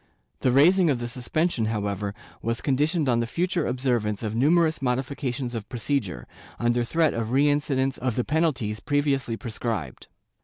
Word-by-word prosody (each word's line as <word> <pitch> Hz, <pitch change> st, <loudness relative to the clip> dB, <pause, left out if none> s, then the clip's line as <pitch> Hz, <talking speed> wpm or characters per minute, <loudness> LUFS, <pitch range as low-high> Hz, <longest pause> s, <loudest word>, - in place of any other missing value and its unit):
The 130 Hz, -, +2 dB
raising 170 Hz, +7 st, +5 dB
of 135 Hz, -, +2 dB
the 120 Hz, 0 st, -4 dB
suspension, 125 Hz, +2 st, -1 dB
however, 100 Hz, -2 st, -2 dB, 0.3 s
was 115 Hz, +1 st, -1 dB
conditioned 150 Hz, +3 st, +1 dB
on 120 Hz, -2 st, +3 dB
the 115 Hz, -, -1 dB
future 175 Hz, +4 st, 0 dB
obser 125 Hz, -1 st, +1 dB
vance 105 Hz, 0 st, -3 dB
of 110 Hz, -1 st, -2 dB
numerous 160 Hz, +5 st, +3 dB
modifications 130 Hz, -1 st, -2 dB
of 115 Hz, -3 st, -5 dB
procedure, 115 Hz, -, -2 dB, 0.3 s
under 120 Hz, 0 st, +1 dB
threat 160 Hz, +6 st, +2 dB
of 115 Hz, -1 st, -2 dB
reincidence 140 Hz, -1 st, +2 dB
of 125 Hz, -3 st, -1 dB
the 125 Hz, -, +1 dB
penalties 135 Hz, -9 st, 0 dB
previously 140 Hz, -5 st, 0 dB
prescribed. 110 Hz, -, -4 dB
125 Hz, 155 wpm, -25 LUFS, 115-145 Hz, 0.3 s, raising